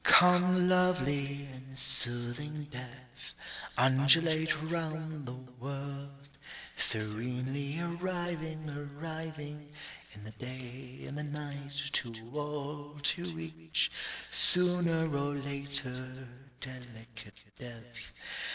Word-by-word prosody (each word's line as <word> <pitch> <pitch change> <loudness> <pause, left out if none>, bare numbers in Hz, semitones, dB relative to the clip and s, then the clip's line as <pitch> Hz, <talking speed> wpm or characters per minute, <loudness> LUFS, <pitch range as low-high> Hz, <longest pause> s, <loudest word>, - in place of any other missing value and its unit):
_Come, 180 0 +7
lovely 145 -6 +2
and 130 +1 -11
soothing 135 +3 0
death. 125 0 -9 0.4
Undulate 155 +5 +5
round 160 -3 -3
the 125 - -5 0.3
world, 140 +1 -6 0.5
serenely 125 +7 +2
arriving, 170 -2 -3
arriving, 150 0 -6 0.4
In 105 - -11
the, 110 - -8
day, 125 +2 -9
in - - -6
the 150 +1 -3
night, 145 -1 -5
to 120 -3 0 0.2
all, 145 0 -4
to 85 - -1
each, 80 0 0 0.4
Sooner 175 -2 +5
or 140 +1 0
later, 135 -2 -3 0.3
delicate 115 -5 -9 0.2
death_. 120 -1 -10
140 Hz, 85 wpm, -33 LUFS, 125-155 Hz, 0.5 s, Come